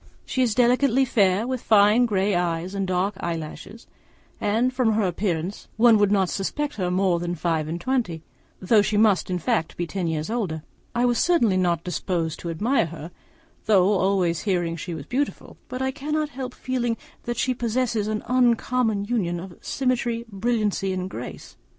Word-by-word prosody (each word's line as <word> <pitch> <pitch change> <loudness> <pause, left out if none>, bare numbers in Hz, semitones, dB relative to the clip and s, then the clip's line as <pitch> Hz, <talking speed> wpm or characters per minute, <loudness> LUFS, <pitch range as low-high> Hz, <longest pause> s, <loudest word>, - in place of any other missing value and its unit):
She 260 - -1
is 235 -4 +2
delicately 255 +1 +3
fair, 200 -3 +2
with 255 -1 -3
fine 215 +3 +5
grey 200 -1 +1
eyes 175 +1 -1
and 195 -1 -2
dark 185 +3 0
eyelashes; 170 +6 -6 0.5
and 230 +5 +1
from 245 -4 +2
her 215 0 +1
appearance 180 0 -2
one 225 -1 +6
would 205 -1 +3
not 195 -2 +3
suppose 285 - -3
her 180 -3 -1
more 180 -1 +2
than 175 0 -3
five 160 -2 -1
and 165 +2 -3
twenty, 180 -8 -1 0.4
though 210 +3 +4
she 205 +1 0
must 210 -4 +3
in 180 - 0
fact 160 -1 -1
be 175 - -1
ten 180 0 -3
years 160 +3 -2
older. 180 -10 -2 0.3
I 240 +1 +2
was 240 -1 +2
certainly 240 - +3
not 175 -3 +1
disposed 175 -3 -2
to 170 - -5
admire 210 - +1
her, 165 +1 -9 0.6
though 195 -2 +5
always 185 -3 +1
hearing 175 -5 -1
she 170 0 -5
was 160 - -7
beautiful; 280 +4 -3
but 255 +1 -3
I 265 - 0
cannot 300 +2 -2
help 255 -2 -6
feeling 240 -3 -2 0.3
that 240 -1 -3
she 255 +2 +1
possesses 235 -2 -1
an 215 0 -2
uncommon 240 -3 +2
union 195 -7 -1
of 180 0 -9
symmetry, 240 -3 -1
brilliancy, 205 -2 0
and 185 0 -4
grace. - - -8
205 Hz, 175 wpm, -24 LUFS, 180-240 Hz, 0.6 s, one